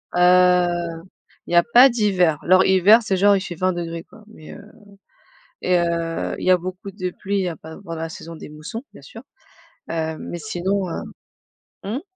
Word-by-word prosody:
Heu, 180 Hz, -2 st, +3 dB, 0.4 s
il -, -, -5 dB
y -, -, +3 dB
a 170 Hz, -, +6 dB
pas 255 Hz, +3 st, +9 dB
d'hiver, 190 Hz, -, +1 dB
alors, 185 Hz, +1 st, +4 dB
hiver, 190 Hz, +4 st, +6 dB
c'est 205 Hz, -4 st, -1 dB
genre, 200 Hz, +2 st, +5 dB
il 195 Hz, -, -1 dB
fait 185 Hz, -2 st, -6 dB
20 185 Hz, +2 st, 0 dB
degrés, 170 Hz, -1 st, -5 dB
quoi, 215 Hz, -, -18 dB
mais 185 Hz, -8 st, -13 dB
heu -, -, -11 dB, 1.0 s
et 180 Hz, 0 st, +2 dB
heu, 170 Hz, -1 st, -2 dB
il -, -, -5 dB
y 185 Hz, -, +4 dB
a 185 Hz, -, +6 dB
beaucoup 185 Hz, +2 st, -7 dB
de 185 Hz, -1 st, -4 dB
pluie, 200 Hz, 0 st, -2 dB
il -, -, 0 dB
y -, -, -2 dB
a 165 Hz, -, -6 dB
pas 160 Hz, -, -12 dB
à -, -, -11 dB
part 165 Hz, -4 st, -7 dB
la 165 Hz, 0 st, -5 dB
saison 165 Hz, 0 st, -10 dB
des 155 Hz, -, -10 dB
moussons, 155 Hz, -, -8 dB
bien -, -, -14 dB
sûr, -, -, -12 dB, 0.7 s
heu, 160 Hz, -1 st, -3 dB
mais 175 Hz, -, -6 dB
sinon, 190 Hz, 0 st, -2 dB
heu. -, -, -4 dB, 0.8 s
Mmh? 220 Hz, +8 st, -4 dB
180 Hz, 205 wpm, -21 LUFS, 170-195 Hz, 1.0 s, pas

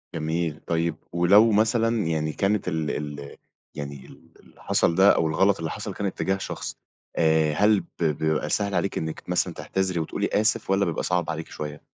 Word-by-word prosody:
جميل، 80 Hz, -1 st, -2 dB
طيب 85 Hz, -1 st, 0 dB, 0.2 s
ولو 100 Hz, +6 st, +5 dB
مثلًا 110 Hz, +1 st, +2 dB
يعني 80 Hz, -1 st, -1 dB
كانت 100 Hz, -1 st, 0 dB
ال 80 Hz, -3 st, -1 dB, 0.3 s
ال 70 Hz, 0 st, -10 dB, 0.4 s
يعني 70 Hz, -2 st, -7 dB
ال -, -, -17 dB
اللي -, -, -21 dB
حصل 85 Hz, -, +2 dB
ده، 95 Hz, +2 st, +6 dB
أو 80 Hz, -, +1 dB
الغلط 95 Hz, +5 st, +2 dB
اللي 80 Hz, -1 st, -3 dB
حصل، 105 Hz, -2 st, -5 dB
كان 100 Hz, -, -4 dB
اتجاه 95 Hz, +1 st, -1 dB
شخصي، -, -, -5 dB, 0.4 s
آآ 80 Hz, -2 st, +3 dB
هل 105 Hz, +4 st, +4 dB
ب 85 Hz, -1 st, -8 dB
بيبقى 80 Hz, 0 st, 0 dB
سهل 100 Hz, -2 st, 0 dB
عليكِ 90 Hz, +3 st, -1 dB
إنِّك 80 Hz, 0 st, -4 dB
مثلًا -, -, +1 dB
تعتذري 95 Hz, -2 st, -2 dB
وتقولي 80 Hz, -, -2 dB
آسف، 105 Hz, -1 st, +1 dB
والّا 95 Hz, +1 st, +3 dB
بيبقى 85 Hz, -3 st, -2 dB
صعب 90 Hz, -2 st, 0 dB
عليكِ 80 Hz, +1 st, -4 dB
شوية؟ 75 Hz, -1 st, -7 dB
85 Hz, 180 wpm, -25 LUFS, 80-100 Hz, 0.4 s, ده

